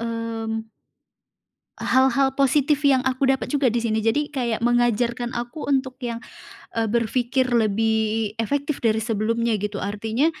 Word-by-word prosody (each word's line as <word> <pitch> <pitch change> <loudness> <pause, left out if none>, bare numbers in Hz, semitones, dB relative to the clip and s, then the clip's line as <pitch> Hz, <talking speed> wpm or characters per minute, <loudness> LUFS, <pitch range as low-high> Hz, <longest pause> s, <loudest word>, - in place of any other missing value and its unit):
mmm 225 -1 -4 1.1
Hal-hal 265 +1 +2
positif 285 +2 +3
yang 265 -2 +4
aku 265 +1 0
dapat 265 0 +1
juga 285 -2 +1
di 235 -1 +1
sini. 220 -2 0
Jadi 225 +7 0
kayak 240 -6 -2
mengajarkan 240 0 +1
aku 240 +6 -5
untuk 260 -2 0
yang, 235 0 -4 0.5
eee, 225 -1 0
berpikir 240 +3 +1
lebih 220 -1 +1
efektif 285 +5 -2
dari 220 -2 +2
sebelumnya 225 +1 0
gitu. 205 -1 -3
Artinya, 220 +8 -1
235 Hz, 135 wpm, -23 LUFS, 225-265 Hz, 1.1 s, yang